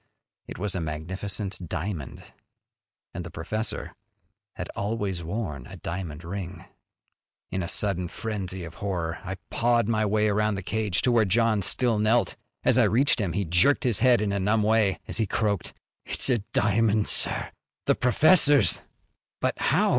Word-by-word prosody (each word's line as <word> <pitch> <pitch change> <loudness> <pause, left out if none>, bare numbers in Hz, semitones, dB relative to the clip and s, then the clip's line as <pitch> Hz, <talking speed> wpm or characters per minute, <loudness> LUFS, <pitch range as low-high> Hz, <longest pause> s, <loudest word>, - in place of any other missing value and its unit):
It - - -8
was 100 0 -2
a 90 - -2
magnificent 95 +4 -4
diamond 85 -3 -4 0.9
and 90 - -5
the 85 - -7
professor 110 +8 -3 0.6
had 90 - -5
always 100 -4 -2
worn 80 - -4
a - - -10
diamond 85 -3 -5
ring! 90 0 -6 0.9
In 95 - -1
a 85 - -3
sudden 90 -2 0
frenzy 95 -2 -4
of 85 -1 -8
horror 85 -5 -2
I 95 +1 -4 0.2
pawed 120 -2 +2
my 110 -1 +1
way 105 +1 +2
around 105 0 +1
the 95 - -5
cage 105 -2 -1
to 125 - +3
where 115 -2 +4
John 110 +1 +2
still 110 +3 +2
knelt. 110 +3 +2 0.3
As - - +4
I - - +6
reached 130 +1 +3
him 90 -5 -1
he 100 +2 -1
jerked 90 - +3
his 120 -5 +2
head 125 -2 +5
in 105 -2 0
a 100 - 0
numb 105 +3 +2
way 110 -2 +3
as - - -4
he 110 -3 +1
croaked, 100 -2 -1 0.3
"It's - - -1
a 120 - +3
diamond, 105 0 +2
sir! - - 0 0.3
The - - +4
professor's!" 145 - +4 0.6
"But - - -1
how?" - - +2
100 Hz, 165 wpm, -26 LUFS, 90-110 Hz, 0.9 s, I